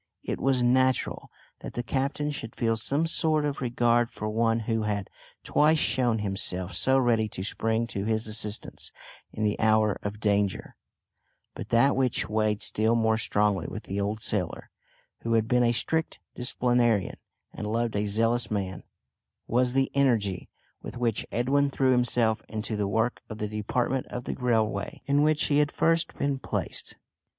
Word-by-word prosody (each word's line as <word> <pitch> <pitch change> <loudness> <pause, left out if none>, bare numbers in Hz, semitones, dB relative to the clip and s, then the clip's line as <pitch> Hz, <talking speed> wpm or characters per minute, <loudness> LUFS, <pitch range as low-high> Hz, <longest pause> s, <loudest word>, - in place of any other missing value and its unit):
It - - -3
was 130 -2 +2
natural 130 +1 +1 0.3
that - - -8
the 120 - -2
captain 140 +3 -1
should 115 -6 -7
feel 115 -2 +1
some 140 +8 0
sort 155 -2 +2
of 145 -2 -3
regard 120 -1 +2
for 105 -3 -5
one 115 +1 +1
who 115 0 -1
had 105 -2 -2 0.3
twice 155 +2 +3
shown 120 -6 +2
himself 95 -3 -1
so 130 +10 +3
ready 115 -4 +2
to 95 - -6
spring 110 +3 -1
to 100 -2 -3
his 110 0 0
assistance 105 -1 -4 0.4
in 110 - -4
the 105 -1 0
hour 110 -2 +3
of 105 0 -5
danger; 100 -2 0 0.8
but - - -8
that 125 +5 +4
which 130 -3 +1
weighed 105 -1 0
still 110 +2 +1
more 110 -1 +2
strongly 105 -5 +1
with - - -7
the 100 +1 -3
old 105 +2 -2
sailor 100 -6 -2 0.5
who 115 - -2
had 110 -1 +2
been 125 0 +3
a 120 - +3
strict 160 +7 0 0.2
disciplinarian 120 -4 +1 0.4
and 105 0 -4
loved 115 -1 -1
a 105 0 0
zealous 115 +3 +1
man 95 -4 -3 0.6
was 125 +1 +1
the 135 0 +1
energy, 115 -9 +1 0.3
with - - -8
which 120 -3 -1
Edwin 135 +5 +2
threw 135 -1 +2
himself 120 -3 +2
into 110 0 -3
the 105 -1 -1
work 115 +4 0
of 110 - -6
the 105 - -2
department 120 +5 -1
of 125 - -6
the - - -3
railway, 115 -4 -1
in 140 +1 +2
which 150 0 +3
he 145 0 +2
had 150 -1 +2
first 165 0 +1
been 140 -1 -1
placed. - - -4
115 Hz, 170 wpm, -27 LUFS, 105-130 Hz, 0.8 s, that